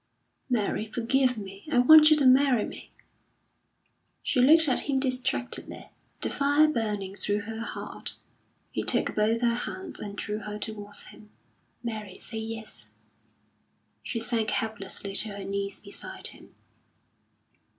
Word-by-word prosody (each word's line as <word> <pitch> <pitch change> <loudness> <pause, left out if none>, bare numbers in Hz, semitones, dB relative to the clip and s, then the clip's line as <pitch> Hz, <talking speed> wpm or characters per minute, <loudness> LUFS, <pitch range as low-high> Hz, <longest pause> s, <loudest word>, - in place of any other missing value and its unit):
"Mary, 220 -2 0
forgive 250 +3 +1
me! 195 -1 -8
I 265 - +2
want 305 +5 +9
you 310 - +5
to 285 - +2
marry 260 -2 +5
me." - - -10 1.3
She 250 - +2
looked 315 +5 +7
at 260 - +2
him 270 -1 +2
distractedly, 255 -1 -2 0.3
the - - 0
fire 285 +2 +4
burning 210 -8 -2
through 205 +1 0
her 220 +2 -7
heart. 230 - -3 0.6
He - - -2
took - - +2
both 220 +2 +1
her 235 -1 +3
hands 195 -5 -5
and 205 -1 -6
drew 210 0 -3
her 210 0 -6
towards 210 -1 -6
him. 215 - -16 0.5
"Mary, 215 -5 -5
say 225 - -6
yes." 220 0 -6 1.1
She 230 - -3
sank 225 -1 0
helplessly 200 -2 -3
to 210 -2 +1
her 195 - -6
knees 200 0 -3
beside 200 -1 -6
him. - - -16
225 Hz, 140 wpm, -27 LUFS, 205-255 Hz, 1.3 s, want